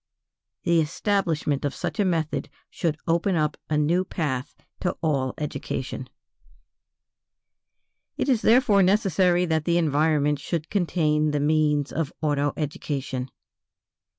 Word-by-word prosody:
The 170 -2 +3
establishment 160 -3 0
of 145 -1 -2
such - - -4
a 205 - +3
method 165 -4 -1 0.2
should 160 -4 -1
open 170 +3 +2
up 150 -2 +1
a 155 - +1
new 165 +5 +2
path 145 -8 -3 0.2
to 180 - -2
all 135 -5 0
education. 150 - -4 2.1
It - - -1
is 250 -5 +2
therefore 220 -4 +5
necessary 185 -2 +3
that 160 -2 0
the 170 0 +2
environment 150 -2 +2
should 160 +1 -4
contain 155 -5 +1
the 150 0 0
means 150 -1 +2
of 155 -3 -2
auto 145 -2 +1
education. 135 -3 -3
155 Hz, 125 wpm, -25 LUFS, 150-175 Hz, 2.1 s, therefore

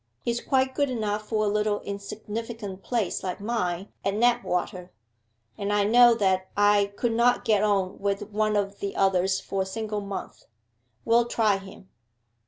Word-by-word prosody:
'He's 235 0 -1
quite 260 0 +1
good 285 0 +1
enough 215 -3 -2
for 215 -1 +1
a - - +1
little 210 0 +1
insignificant 205 0 -6
place 225 -6 -1
like 185 -1 -4
mine 200 -4 -2
at 195 - 0
Knapwater; 210 -6 0 0.7
and 200 +1 -2
I 205 0 +3
know 240 +3 +6
that 190 -3 +1
I 205 -1 +4
could 240 +1 0
not 240 +2 +2
get 215 -4 +3
on 195 -3 0
with 200 +1 -2
one 215 0 +1
of 200 -1 -1
the 200 -1 -4
others 190 0 +2
for 195 - -3
a - - -1
single 210 +1 -3
month. 195 -2 -7 0.6
We'll 235 +1 +4
try 215 -4 +2
him. 195 -1 -13
205 Hz, 165 wpm, -26 LUFS, 195-225 Hz, 0.7 s, know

